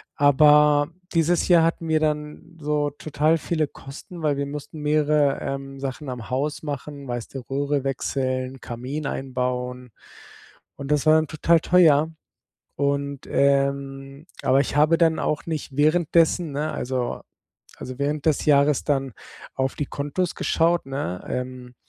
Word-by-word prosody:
Aber 150 Hz, +1 st, +5 dB, 0.2 s
dieses 170 Hz, +1 st, +2 dB
Jahr 170 Hz, -3 st, +6 dB
hatten 165 Hz, 0 st, -1 dB
wir 155 Hz, -1 st, +3 dB
dann 155 Hz, +2 st, -3 dB
so 150 Hz, -1 st, 0 dB
total 155 Hz, +2 st, 0 dB
viele 155 Hz, -1 st, -1 dB
Kosten, 155 Hz, +6 st, -11 dB
weil 145 Hz, -2 st, +1 dB
wir 140 Hz, -, -1 dB
mussten 150 Hz, +2 st, -7 dB
mehrere, 150 Hz, -1 st, +2 dB
ähm, 135 Hz, 0 st, -5 dB
Sachen 135 Hz, +1 st, -5 dB
am 120 Hz, -3 st, -7 dB
Haus 140 Hz, +4 st, -2 dB
machen, 145 Hz, -1 st, -6 dB
weißt 120 Hz, +2 st, -5 dB
du, -, -, -2 dB
Röhre 140 Hz, 0 st, -1 dB
wechseln, 130 Hz, -1 st, -2 dB
Kamin 130 Hz, +5 st, -5 dB
einbauen 125 Hz, -2 st, -3 dB, 0.9 s
und 140 Hz, +1 st, -7 dB
das 150 Hz, 0 st, +2 dB
war 155 Hz, -, +6 dB
dann 160 Hz, -1 st, +2 dB
total 165 Hz, +2 st, +3 dB
teuer. 160 Hz, -3 st, +4 dB, 0.7 s
Und, 140 Hz, 0 st, -1 dB
ähm 140 Hz, +1 st, 0 dB, 0.2 s
aber 135 Hz, +1 st, +3 dB
ich 140 Hz, -, -2 dB
habe 155 Hz, +3 st, +4 dB
dann 165 Hz, -2 st, +3 dB
auch 150 Hz, -, -2 dB
nicht 155 Hz, -4 st, -5 dB
währenddessen 160 Hz, +1 st, +2 dB
ne, 150 Hz, +2 st, -2 dB
also 130 Hz, -3 st, -3 dB, 0.6 s
also 130 Hz, 0 st, -7 dB
während 145 Hz, +1 st, -1 dB
des 155 Hz, -, +1 dB
Jahres 145 Hz, -1 st, +4 dB
dann 135 Hz, -4 st, -1 dB, 0.4 s
auf 130 Hz, 0 st, -1 dB
die 145 Hz, -, -2 dB
Kontos 145 Hz, +5 st, -2 dB
geschaut, 170 Hz, 0 st, +1 dB
ne? 135 Hz, -10 st, -4 dB
Ähm, 125 Hz, -1 st, -5 dB
145 Hz, 145 wpm, -24 LUFS, 135-155 Hz, 0.9 s, Jahr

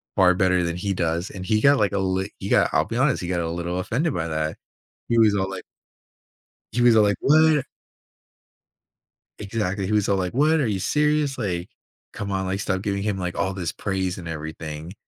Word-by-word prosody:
far 95 Hz, -2 st, +5 dB
better 90 Hz, -1 st, +2 dB
than 85 Hz, 0 st, -2 dB
he 100 Hz, +1 st, -2 dB
does," 85 Hz, +1 st, -1 dB
and 95 Hz, -2 st, -7 dB
he 110 Hz, +2 st, +1 dB
got 140 Hz, +2 st, +5 dB
like 105 Hz, -, +2 dB
a 100 Hz, -, 0 dB
li 95 Hz, +1 st, -1 dB
he -, -, -5 dB
got -, -, +4 dB
I'll -, -, +3 dB
be -, -, -4 dB
honest, -, -, +2 dB
he 90 Hz, -, -4 dB
got 90 Hz, -1 st, -1 dB
a 80 Hz, -, -2 dB
little 85 Hz, +1 st, -3 dB
offended 140 Hz, -, -1 dB
by 85 Hz, 0 st, -2 dB
that. 80 Hz, 0 st, -2 dB, 0.5 s
He 115 Hz, -, +2 dB
was 110 Hz, -2 st, +5 dB
all 95 Hz, 0 st, -1 dB
like 95 Hz, -, -6 dB, 1.1 s
he 120 Hz, +2 st, 0 dB
was 120 Hz, -2 st, +6 dB
all, 110 Hz, -, +6 dB
like, 100 Hz, -1 st, +2 dB
"what?" 155 Hz, -1 st, +4 dB, 1.7 s
Exactly 100 Hz, -2 st, -2 dB
he 100 Hz, -, -3 dB
was 105 Hz, -2 st, +2 dB
all, 100 Hz, -, +2 dB
like, 90 Hz, -1 st, -2 dB
"What? 150 Hz, +5 st, +3 dB
Are 130 Hz, -, +1 dB
you 100 Hz, -3 st, -1 dB
serious"? 150 Hz, +1 st, +1 dB
Like, 90 Hz, -6 st, -3 dB, 0.4 s
"Come 100 Hz, 0 st, -5 dB
on, 95 Hz, -1 st, -1 dB
like, 95 Hz, +1 st, -2 dB
stop 95 Hz, -2 st, -1 dB
giving 100 Hz, -1 st, -2 dB
him, 105 Hz, -2 st, -1 dB
like, 90 Hz, -1 st, -4 dB
all 95 Hz, -, 0 dB
this 90 Hz, -4 st, -3 dB
praise 95 Hz, -2 st, -2 dB
and 85 Hz, -2 st, -8 dB
everything." 80 Hz, +1 st, -6 dB
95 Hz, 215 wpm, -23 LUFS, 90-110 Hz, 1.7 s, was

